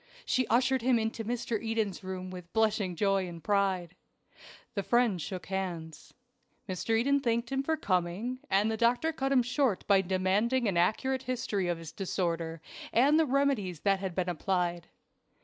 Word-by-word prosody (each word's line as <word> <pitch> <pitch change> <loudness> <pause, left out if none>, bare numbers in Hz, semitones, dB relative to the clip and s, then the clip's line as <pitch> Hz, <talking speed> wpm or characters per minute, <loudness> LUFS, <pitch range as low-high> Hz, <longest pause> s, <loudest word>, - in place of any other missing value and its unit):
She 255 -1 +1
ushered 260 +2 +2
him 250 0 +3
into 225 0 -2
Mr. 230 -1 -2
Eden's 220 -4 -1
room 185 0 -5
with 180 -2 -9
blushing 215 -5 +1
joy 195 0 +1
and 170 -2 -9
pride. 190 -4 +1 0.8
The 200 - -1
friends 230 -3 +2
shook 185 +3 -5
hands. 175 -5 -5 0.5
Mr. 205 +4 0
Eden 280 +4 +3
thanked 235 -2 -1
him 270 0 +1
for 320 +3 0
coming, 190 - -1
and 205 +3 +3
the 220 - -2
doctor 245 +8 +2
cut 270 -3 -2
him 255 -3 +4
short 250 -4 0
by 195 -2 +5
demanding 195 +7 +1
an 195 - 0
accurate 255 +9 +1
history 235 -7 -2
of 175 -1 0
his 165 -1 -9
disorder, 165 -3 -2 0.3
and 285 +6 +4
the 320 - +3
remedies 255 - 0
that 195 -1 +2
had 190 -3 -4
been 185 -1 0
applied. 175 0 -1
205 Hz, 165 wpm, -30 LUFS, 185-245 Hz, 0.8 s, by